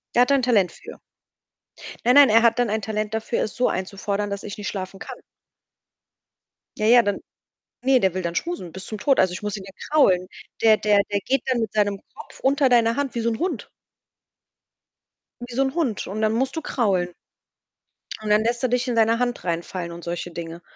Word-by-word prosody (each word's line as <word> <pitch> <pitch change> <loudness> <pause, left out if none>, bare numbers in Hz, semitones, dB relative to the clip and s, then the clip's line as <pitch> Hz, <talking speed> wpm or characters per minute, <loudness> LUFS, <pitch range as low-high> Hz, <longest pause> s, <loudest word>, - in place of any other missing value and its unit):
Der 245 - +6
hat 280 - 0
da - - +6
'n 270 - +2
Talent 210 -7 +3
für. - - -12 1.1
Nein, 245 +2 +5
nein, 285 -1 +8
er 225 +1 +5
hat 235 +1 +3
dann 245 -2 +2
ein 220 +1 -1
Talent 215 0 -3
dafür 220 +2 -1
es 215 - -5
so 250 - +2
einzufordern, 200 +2 -3
dass 200 0 -5
ich 205 - -7
nicht 205 -1 -5
schlafen 190 -1 -5
kann. - - -8 1.6
Ja, 215 - 0
ja, 240 +1 +7
dann 205 -2 -1 0.6
ne, 260 0 +4
der 190 -4 +1
will 185 - -2
dann 170 -1 -3
schmusen 335 - -4
bis 190 0 -9
zum 215 - -6
Tod. 275 +5 +3
Also, 185 -1 +2
ich 180 - -7
muss 210 0 -3
ihn 195 - -9
ja 195 - -11 0.2
kraulen. 185 -12 +4 0.4
Der 220 -1 +6
der 210 -1 +3
der 200 - +2
geht 270 -1 +1
dann 250 -2 +1
mit 220 -3 -2
seinem 205 -2 0
Kopf - - -13
unter 275 0 +3
deiner 230 -1 +3
Hand 285 -2 -2
wie 235 - -1
so 230 - 0
'n 225 - -3
Hund. 360 +3 -3 1.8
Wie 240 - -8
so 270 - +3
'n 265 0 -2
Hund 285 - -1
und 210 +3 -5
dann 215 0 +2
musst 260 +3 -1
du 320 - -3
kraulen. 195 - 0 1.1
Und 215 - -5
dann 210 +1 +4
lässt 235 +1 -1
er 255 - +2
dich 250 +1 0
in 245 - -1
seiner 225 0 +3
Hand 245 -1 -2
reinfallen 170 0 -4
und 170 0 -9
solche 175 0 -5
Dinge. 170 0 -7
215 Hz, 215 wpm, -23 LUFS, 195-245 Hz, 1.8 s, nein